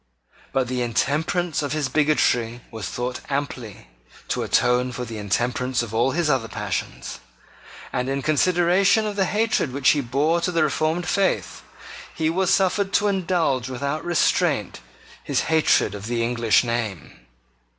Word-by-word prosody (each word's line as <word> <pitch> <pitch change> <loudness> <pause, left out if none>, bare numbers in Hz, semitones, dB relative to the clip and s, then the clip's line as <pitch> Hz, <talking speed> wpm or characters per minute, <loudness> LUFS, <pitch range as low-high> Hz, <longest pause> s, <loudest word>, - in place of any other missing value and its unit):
But 130 -2 0
the 125 0 -2
intemperance 155 +8 0
of 145 -1 -2
his 155 -3 0
bigotry 125 -6 +1
was 110 -5 -5
thought 125 +1 -3
amply 125 - -4 0.4
to - - -1
atone 125 +1 +2
for 125 0 -5
the 110 -2 -7
intemperance 120 +5 -1
of 115 -2 -8
all 120 +4 +2
his 165 +4 0
other 130 -6 +1
passions; 60 - -5 0.7
and, 125 +1 -1
in 135 0 -2
consideration 180 +6 +3
of 210 -1 -3
the 195 -1 +2
hatred 210 - 0
which 135 0 +2
he 145 +1 +3
bore 145 +7 +1
to 180 - 0
the 165 -2 +2
reformed 155 +3 0
faith, 195 -2 0 0.5
he 160 0 0
was 185 +1 +1
suffered 195 +1 +1
to 210 - +3
indulge 165 -10 0
without 140 +4 -3
restraint 175 -1 +1 0.4
his - - 0
hatred 160 -10 +2
of 100 +1 -7
the 115 -1 -1
English 115 -1 +2
name. 115 - -4
140 Hz, 150 wpm, -23 LUFS, 120-170 Hz, 0.7 s, consideration